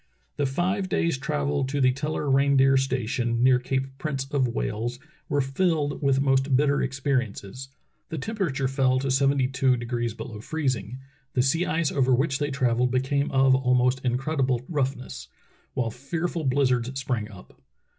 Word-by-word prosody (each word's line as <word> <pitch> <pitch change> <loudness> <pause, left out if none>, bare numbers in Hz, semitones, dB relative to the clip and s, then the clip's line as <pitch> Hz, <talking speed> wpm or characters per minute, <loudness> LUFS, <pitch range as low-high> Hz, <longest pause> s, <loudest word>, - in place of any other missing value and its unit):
The 145 - +1
five 185 +8 -1
days' 165 -6 0
travel 145 0 -1
to 140 +2 -2
the 130 -1 +4
Teller 150 +3 -3
reindeer 135 0 +4
station, 125 -2 0
near 130 -1 +5
Cape 130 +1 -1
Prince 140 -3 -2
of 135 -3 +2
Wales, 115 - -3 0.3
were 145 -1 +2
filled 145 +2 0
with 135 -2 +2
most 135 0 +2
bitter 140 +1 +2
experiences. 130 -3 -2 0.4
The 160 - -4
temperature 150 -6 -2
fell 130 -1 +2
to 135 0 -1
seventy 135 0 +2
two 130 -1 +2
de 120 - -5
grees 120 -2 -2
below 110 -2 -7
freezing; 130 -4 -2 0.4
the 125 - +3
sea 165 +7 +1
ice 165 -2 0
over 130 -2 +3
which 135 +1 0
they 145 0 -1
trav 125 -4 0
elled 125 0 +3
became 135 +3 0
of 135 0 +4
almost 125 0 +2
incredible 130 0 0
roughness; 130 - -3 0.5
while 120 -3 -1
fear 140 +8 -3
ful 170 -3 -4
blizzards 130 -1 +1
sprang 120 -5 -2
up. 95 -4 -15
135 Hz, 165 wpm, -25 LUFS, 125-140 Hz, 0.5 s, near